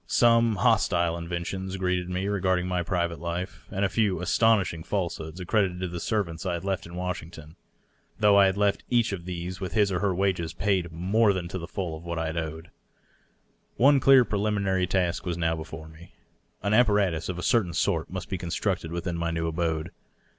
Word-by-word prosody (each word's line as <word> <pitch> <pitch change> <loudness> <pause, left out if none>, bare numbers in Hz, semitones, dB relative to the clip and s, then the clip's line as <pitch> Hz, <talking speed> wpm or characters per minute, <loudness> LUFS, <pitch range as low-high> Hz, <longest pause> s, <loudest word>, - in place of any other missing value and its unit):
Some 115 -2 +4
hostile 85 -2 +2
inventions 90 +3 -4
greeted 90 -1 -1
me 90 +2 -2
regarding 95 -3 0
my 90 -1 0
private 85 -1 -1
life, 85 0 -5
and 100 +1 0
a - - +3
few 100 -1 +1
astonishing 95 -3 +2
falsehoods 85 -3 -3
accredited 90 -1 0
to 90 - -1
the 85 0 -5
servants 85 -5 -2
I 90 -3 -1
had 85 - -6
left 95 -3 -2
in 85 - -10
Washington 85 -3 -6 0.3
— - - -39
though 105 -2 +5
I 100 -1 +7
had 95 +1 -1
left 100 -1 +1
each 120 -2 +2
of 85 -3 -6
these 90 +1 -5
with 90 -3 -4
his 105 -1 +3
or 90 - 0
her 100 -1 0
wages 90 -4 0
paid 95 -3 0
more 100 +6 +2
than 90 -2 -3
to 95 - -4
the 85 - -7
full 90 -4 -4
of 80 - -10
what 85 -1 -4
I 80 - -1
had 80 +1 -3
owed. 80 +1 -5 1.0
One 140 +2 +5
dear 135 -2 +6
preliminary 100 -3 0
task 90 -1 0
was 90 -3 -3
now 80 -1 +1
before 80 0 -8
me. 80 +2 -15 0.5
An 100 +2 +1
apparatus 105 -8 +3
of 90 - -3
a 90 - -5
CGrtsin 95 -8 +2
sort 85 -4 0
must 95 +1 -5
be 95 -3 -4
constructed 85 0 -2
within 85 0 -3
my 85 0 -1
new 80 0 -2
abode. 80 -1 -2
90 Hz, 200 wpm, -27 LUFS, 85-100 Hz, 1.0 s, I